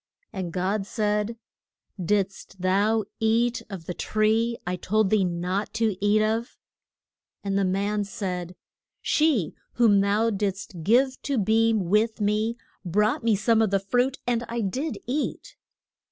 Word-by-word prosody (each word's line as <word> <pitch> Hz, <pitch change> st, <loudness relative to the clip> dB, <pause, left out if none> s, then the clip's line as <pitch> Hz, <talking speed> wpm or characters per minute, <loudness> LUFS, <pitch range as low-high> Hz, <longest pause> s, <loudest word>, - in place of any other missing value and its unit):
And 185 Hz, -3 st, -4 dB
God 195 Hz, +3 st, -1 dB
said, 210 Hz, +1 st, -1 dB, 0.7 s
Did'st 195 Hz, 0 st, -1 dB
thou 200 Hz, +4 st, +2 dB
eat 230 Hz, +2 st, +2 dB
of 190 Hz, -5 st, -7 dB
the 180 Hz, -, -4 dB
tree 220 Hz, +4 st, +1 dB
I 180 Hz, +1 st, -1 dB
told 200 Hz, +3 st, +1 dB
thee 215 Hz, -3 st, +4 dB
not 180 Hz, +4 st, -2 dB
to 225 Hz, -3 st, +1 dB
eat 210 Hz, +1 st, +4 dB
of? 225 Hz, +2 st, -1 dB, 0.9 s
And 200 Hz, -1 st, -1 dB
the 200 Hz, -, +2 dB
man 200 Hz, +3 st, 0 dB
said, 180 Hz, -3 st, -4 dB, 0.5 s
She 300 Hz, -, +2 dB, 0.2 s
whom 220 Hz, -5 st, +4 dB
thou 210 Hz, +3 st, +2 dB
dids't 195 Hz, -3 st, -3 dB
give 245 Hz, +8 st, +4 dB
me -, -, -14 dB
to 280 Hz, -2 st, -1 dB
be 225 Hz, +2 st, +3 dB
with 215 Hz, +4 st, +1 dB
me 215 Hz, +3 st, 0 dB, 0.3 s
brought 210 Hz, +6 st, +1 dB
me 230 Hz, -2 st, +3 dB
some 225 Hz, +3 st, +2 dB
of 220 Hz, -, +2 dB
the 195 Hz, 0 st, +2 dB
fruit, 245 Hz, +7 st, 0 dB
and 240 Hz, -1 st, 0 dB
I 235 Hz, 0 st, -2 dB
did 260 Hz, +10 st, -2 dB
eat. 280 Hz, +5 st, -3 dB
210 Hz, 150 wpm, -25 LUFS, 195-230 Hz, 0.9 s, thee